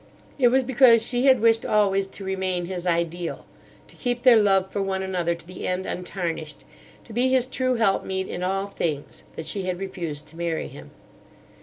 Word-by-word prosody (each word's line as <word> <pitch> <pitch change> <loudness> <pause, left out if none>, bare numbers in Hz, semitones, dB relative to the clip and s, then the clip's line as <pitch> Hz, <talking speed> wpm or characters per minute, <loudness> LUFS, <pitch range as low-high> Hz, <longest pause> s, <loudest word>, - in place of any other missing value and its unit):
"It 250 - +6
was 260 +2 +3
because 240 -3 +5
she 245 +2 0
had 260 -4 +5
wished 225 0 +4
always 195 -2 +2
to 195 - -8
remain 190 -2 -2
his 180 0 -5
ideal; 170 0 -2 0.4
to - - -18
keep 245 -1 -2
their 240 -4 +7
love 195 -2 +2
for 200 - -2
one 190 -1 -1
another 175 -3 -1
to 170 - -13
the 180 +1 -6
end, 185 +1 -1
untarnished; 170 -4 -4 0.4
to 225 - -12
be 250 +3 +2
his 260 -1 +3
true 255 0 -1
helpmeet 190 -4 0
in 175 - -5
all 195 +2 -1
things, 160 -7 -4
that 160 - -6
she 195 -2 -1
had 180 -1 -1
refused 170 -6 -5
to 165 - -12
marry 170 -2 -2
him. - - -12
190 Hz, 190 wpm, -24 LUFS, 175-230 Hz, 0.4 s, their